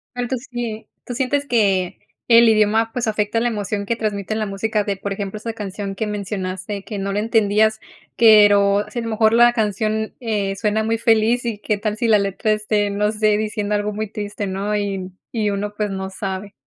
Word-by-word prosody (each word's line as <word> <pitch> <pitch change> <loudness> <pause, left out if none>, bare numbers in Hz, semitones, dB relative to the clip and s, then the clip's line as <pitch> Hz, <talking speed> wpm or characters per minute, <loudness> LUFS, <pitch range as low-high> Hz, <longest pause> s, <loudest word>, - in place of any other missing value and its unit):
Tanto 245 +1 -2
así, 240 -1 -5
¿eh?, 220 -1 -7 0.2
tú 245 - -5
sientes 275 +3 0
que 195 -8 +1 0.3
el 235 0 +7
idioma, 220 +1 +3
pues, 245 -1 -1
afecta 215 +1 0
la 240 - +1
emoción 205 -1 -3
que 230 +2 -1
transmite 210 -1 -2
la 220 - -1
música 210 +1 -1
de, 200 - -1
por 200 +1 -5
ejemplo, 200 +1 -4
esa 230 +2 -4
canción 200 -2 -5
que 215 +2 -3
mencionaste, 200 -1 -4
que 210 - -6
no 195 0 -2
la 205 - 0
entendías, 220 0 +2 0.3
pero 205 -2 +6
si 240 - -4
a - - -2
lo 230 - -4
mejor 220 0 +3
la 240 +1 +6
canción, 220 -1 -1
eh, 205 -4 -1
suena 215 +1 0
muy 225 0 0
feliz 225 +1 +2
y 230 -3 -3
qué 210 0 -1
tal 210 +1 -2
si 235 - 0
la 220 -2 +5
letra 200 +2 0
esté, 210 -1 0
no 210 +1 0
sé, 215 -1 +2
diciendo 210 -1 -2
algo 205 0 -1
muy 215 +1 -3
triste, 205 -2 -5
¿no?, 195 +2 -2
y 195 -2 -3 0.2
y 215 -3 0
uno, 205 +1 -3
pues, 210 -1 -1
no 190 0 -4
sabe. 195 +1 -5
210 Hz, 210 wpm, -20 LUFS, 200-225 Hz, 0.3 s, el